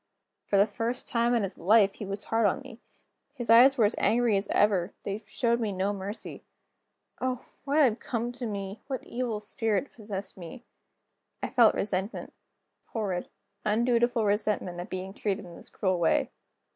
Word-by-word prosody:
For 200 - +2
the 200 - +6
first 235 +3 -3
time 235 +1 +2
in 230 - +2
his 195 -1 -4
life, 200 +3 +5
he 205 - -6
was 200 +1 -4
hard 225 -1 +2
on 200 - -1
me. 260 -4 -12 0.6
His 240 -4 -1
eyes 260 +4 +8
were 225 - +5
as 205 - +2
angry 235 -2 +3
as 195 +1 0
ever; 200 -3 +2
they 200 +1 -3
showed 235 0 +1
me 220 -3 -1
no 195 +2 -1
mercy. 200 +3 -6 0.8
Oh, 255 -1 -2 0.2
what 285 +1 +1
had 245 -5 +3
come 235 0 -2
to 245 -1 -5
me? 200 -1 -5
what 265 -2 -4
evil 235 -3 -3
spirit 215 +3 0
possessed 205 -4 -7
me? 180 +8 -9 0.8
I - - -1
felt 235 -3 +5
resentment; 195 +1 -3 0.6
horrid, 195 -6 -2 0.3
undutiful 235 +1 +2
resentment, 205 -3 0
at 175 - -6
being 185 +1 -5
treated 205 -1 -2
in 175 -1 -11
this - - -11
cruel 185 -3 0
way. 165 - +2
215 Hz, 170 wpm, -28 LUFS, 195-235 Hz, 0.8 s, eyes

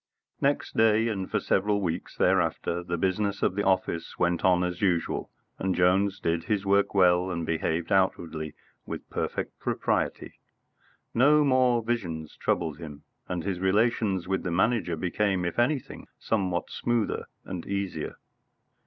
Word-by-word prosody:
III - - +4
Next 145 - -4
day, 110 0 +4
and 95 -4 -3
for - - +1
several 100 +1 +1
weeks 85 -5 -3
thereafter, 85 +1 +1
the 85 0 -3
business 100 +3 0
of - - +2
the 100 - -1
office 95 -4 0
went 85 -1 +1
on 90 -1 +4
as 90 -1 -3
usual, 90 -4 0 0.3
and 95 0 0
Jones 95 +2 +2
did 85 0 -1
his 100 0 0
work 100 +1 +2
well 90 -1 +4
and 85 -2 -3
behaved 80 +1 -1
outwardly 80 -5 0 0.3
with - - -6
perfect - - -3
propriety. - - -2 0.7
No 145 +5 +5
more 130 -4 +3
visions 85 -10 -3
troubled 80 -3 -1
him, 75 -3 -9 0.3
and 90 -2 -2
his 95 -3 -2
relations 95 -1 +1
with 95 0 0
the 90 - -3
Manager 95 0 +1
became, 95 +1 0
if 85 +6 -2
anything, 130 +2 -1
somewhat 95 -5 -1
smoother 120 -2 -1 0.2
and 90 -3 -6
easier. 100 -5 -3
95 Hz, 150 wpm, -27 LUFS, 85-105 Hz, 0.7 s, No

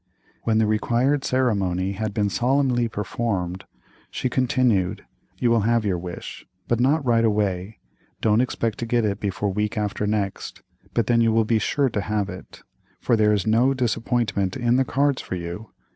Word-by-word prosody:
When 110 -1 +2
the 110 - +3
required 120 +6 +1
ceremony 100 -8 0
had 105 +2 -3
been 105 -1 0
solemnly 125 -1 +1
performed, 95 -3 -3 0.4
she 130 - -3
continued: 120 -8 +1 0.3
"You 120 - +1
will 115 - +4
have 115 +1 +1
your 95 -4 0
wish, 85 0 -8 0.2
but 120 - +1
not 140 +4 +2
right 115 -2 +3
away; 105 -2 0 0.4
don't 110 +1 +3
expect 115 -3 -2
to 120 - -3
get 120 -1 +1
it 100 -1 -1
before 100 0 -2
week 105 +2 -2
after 105 0 -1
next, 105 -2 -3 0.3
but 115 - +2
then 115 -1 +3
you 115 -1 +3
will 110 0 +3
be 110 0 +2
sure 135 +3 +1
to 100 - -1
have 105 -1 -1
it, 95 0 -10 0.4
for 120 - +2
there 105 -1 +3
is 100 -3 +1
no 120 +5 +3
disappointment 115 -5 -1
in 120 -1 +2
the 130 - +2
cards 140 +1 +1
for - - -5
you." 85 +5 -6
110 Hz, 175 wpm, -23 LUFS, 100-120 Hz, 0.4 s, will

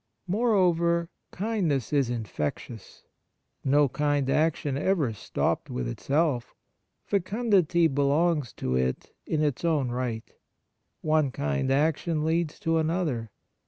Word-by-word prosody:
Moreover, 175 -6 +2 0.2
kindness 180 - -1
is 140 -4 +2
infectious. 110 - -5 0.6
No 145 +2 +4
kind 145 0 0
action 155 -2 +1
ever 145 -5 +1
stopped 105 - -2
with 60 -1 -3
itself. 135 - -1 0.5
Fecundity 190 -4 +2
belongs 145 0 +1
to 65 - -2
it 65 0 -1
in 155 -1 0
its 145 -5 0
owm 150 -7 +1
right. 120 -2 -4 0.7
One 155 -2 +2
kind 70 - -1
action 155 +2 +1
leads 165 -1 0
to 165 0 +1
another. 155 -8 -1
150 Hz, 110 wpm, -27 LUFS, 130-170 Hz, 0.7 s, No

